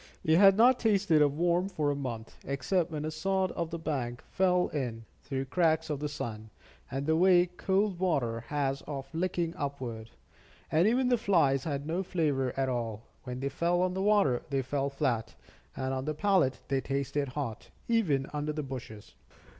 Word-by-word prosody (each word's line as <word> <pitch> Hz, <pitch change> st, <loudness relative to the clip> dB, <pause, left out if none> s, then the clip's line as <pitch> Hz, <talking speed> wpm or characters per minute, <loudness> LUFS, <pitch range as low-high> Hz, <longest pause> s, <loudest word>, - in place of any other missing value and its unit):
They 160 Hz, -, +4 dB
had 195 Hz, +3 st, +7 dB
not 250 Hz, +3 st, +6 dB
tasted 200 Hz, -8 st, +3 dB
a 150 Hz, -, +6 dB
worm 175 Hz, +5 st, +1 dB
for 150 Hz, -6 st, 0 dB
a -, -, -1 dB
month, 120 Hz, -5 st, -5 dB
except 155 Hz, +6 st, 0 dB
when 155 Hz, -2 st, -4 dB
a 155 Hz, -, -2 dB
sod 190 Hz, +4 st, 0 dB
of 170 Hz, -2 st, -3 dB
the 170 Hz, -, -4 dB
bank 130 Hz, -7 st, -3 dB
fell 180 Hz, -1 st, +2 dB
in, 120 Hz, -6 st, -4 dB, 0.2 s
through 135 Hz, -1 st, -3 dB
cracks 160 Hz, +1 st, +1 dB
of 145 Hz, -, -2 dB
the 150 Hz, 0 st, -2 dB
sun, 110 Hz, -7 st, -6 dB, 0.4 s
and 135 Hz, +1 st, -3 dB
the 160 Hz, +1 st, +2 dB
way 180 Hz, +1 st, +5 dB
cold 190 Hz, +1 st, 0 dB
water 135 Hz, -11 st, 0 dB
has 140 Hz, -2 st, -1 dB
of 135 Hz, -1 st, -6 dB
licking 170 Hz, 0 st, -1 dB
upward. 125 Hz, -6 st, -5 dB, 0.6 s
And 165 Hz, +5 st, +4 dB
even 250 Hz, +3 st, +2 dB
the 245 Hz, -2 st, +3 dB
flies 145 Hz, -, +2 dB
had 140 Hz, -3 st, -3 dB
no 165 Hz, +4 st, -1 dB
flavor 150 Hz, -8 st, 0 dB
at 135 Hz, -1 st, +1 dB
all; 115 Hz, -3 st, -3 dB, 0.2 s
when 125 Hz, 0 st, -5 dB
they 140 Hz, -, -1 dB
fell 170 Hz, +5 st, +1 dB
on 185 Hz, 0 st, 0 dB
the 190 Hz, -, -2 dB
water, 200 Hz, -12 st, +3 dB
they 135 Hz, -1 st, 0 dB
fell 140 Hz, +2 st, -1 dB
flat, 120 Hz, -5 st, -1 dB, 0.4 s
and 130 Hz, 0 st, -2 dB
on 130 Hz, 0 st, -3 dB
the 155 Hz, 0 st, -2 dB
palate 190 Hz, -7 st, +2 dB
they 135 Hz, -1 st, 0 dB
tasted 140 Hz, +1 st, -2 dB
hot, 125 Hz, -4 st, -5 dB, 0.2 s
even 175 Hz, -, +2 dB
under 150 Hz, +1 st, -2 dB
the 150 Hz, 0 st, -3 dB
bushes. 115 Hz, -, -8 dB
150 Hz, 185 wpm, -30 LUFS, 135-180 Hz, 0.6 s, had